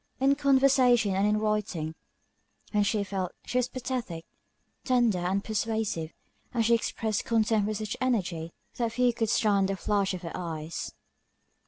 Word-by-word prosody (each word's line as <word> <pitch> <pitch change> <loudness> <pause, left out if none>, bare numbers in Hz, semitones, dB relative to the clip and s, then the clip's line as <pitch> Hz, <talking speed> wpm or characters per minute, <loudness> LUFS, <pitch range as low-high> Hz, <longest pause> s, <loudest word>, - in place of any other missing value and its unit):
In 270 +1 +4
conversation, 265 -6 +4
and 195 +2 +2
in 210 0 +2
writing, 210 -7 -1 0.8
when 210 - +2
she 205 0 +1
felt, 190 -2 -3
she 250 - 0
was 250 - +1
pathetic, 245 -10 -4 0.6
tender 240 -7 +2
and 190 +3 0
persuasive; 220 -7 -2 0.4
and 230 -2 +1
she 235 - +4
expressed 220 -2 0
contempt 220 -2 +2
with 215 -1 -2
such 215 -1 -4
energy, 185 -10 -1 0.3
that 230 -2 -1
few 250 0 +3
could 225 -2 -1
stand 200 -3 +2
the 195 - 0
flash 195 0 0
of 180 - -8
her 165 - -5
eyes. 160 -2 -5
215 Hz, 155 wpm, -28 LUFS, 190-235 Hz, 0.8 s, In